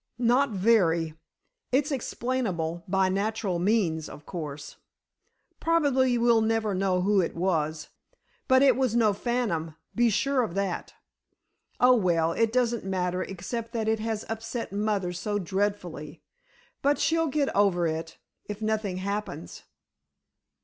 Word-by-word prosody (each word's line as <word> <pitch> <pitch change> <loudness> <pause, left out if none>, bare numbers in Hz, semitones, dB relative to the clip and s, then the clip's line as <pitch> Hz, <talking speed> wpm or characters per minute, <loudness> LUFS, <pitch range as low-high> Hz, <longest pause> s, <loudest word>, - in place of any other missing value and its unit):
"Not 250 +3 +3
very. 185 -6 +2 0.6
It's 285 +4 +2
explainable 225 - -2
by 190 0 +2
natural 200 -1 -1
means, 175 -5 +1
of 150 - -11
course. 145 -4 -7 0.8
Probably 275 -7 +2
we'll 235 -1 +4
never 220 -1 +1
know 185 -1 +1
who 200 +1 +3
it 170 - -3
was, 160 -3 -1 0.6
but 260 +1 +5
it 265 -4 +6
was 255 -3 0
no 220 -3 +4
phantom, 195 -9 -2 0.2
be 240 0 +3
sure 275 +5 +1
of 205 -7 -3
that." 195 -2 -3 0.8
"Oh, 250 +1 +6
well, 170 -6 +2
it 225 +5 +1
doesn't 240 -1 +1
matter, 185 -1 -1
except 225 +6 -5
that 225 -2 -1
it 220 0 +1
has 220 -1 -3
upset 225 0 -4
mother 200 -3 -1
so 205 +4 -2
dreadfully. 180 -5 -3 0.6
But 285 +1 +2
she'll 325 0 +1
get 285 -1 0
over 195 -4 +3
it—if 165 +5 -6
nothing 215 -3 -1
happens." 200 - -5
205 Hz, 130 wpm, -27 LUFS, 180-235 Hz, 0.8 s, it